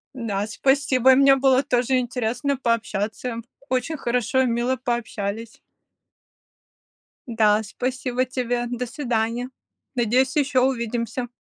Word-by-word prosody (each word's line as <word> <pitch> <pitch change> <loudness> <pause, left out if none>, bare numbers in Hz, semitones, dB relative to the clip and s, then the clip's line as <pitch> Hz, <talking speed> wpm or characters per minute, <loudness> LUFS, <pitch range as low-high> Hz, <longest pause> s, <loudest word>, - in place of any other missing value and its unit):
Да, 210 -5 -2
спасибо! 265 +2 +3
И - - +6
мне 275 0 +6
было 265 0 +3
тоже 255 0 +1
интересно 245 +3 -2
пообщаться. 230 -1 -2 0.3
Очень 255 +5 -1
хорошо 250 +1 0
и - - +2
мило 240 +2 0
пообщались. 225 -3 -4 1.7
Да, 220 -2 +3
спасибо 250 +3 -2
тебе. 245 -1 -2
До 245 +1 -3
свидания. 240 -2 -2 0.5
Надеюсь, 255 +4 +2
еще 270 -3 +2
увидимся. 240 -1 -1
245 Hz, 110 wpm, -23 LUFS, 230-260 Hz, 1.7 s, И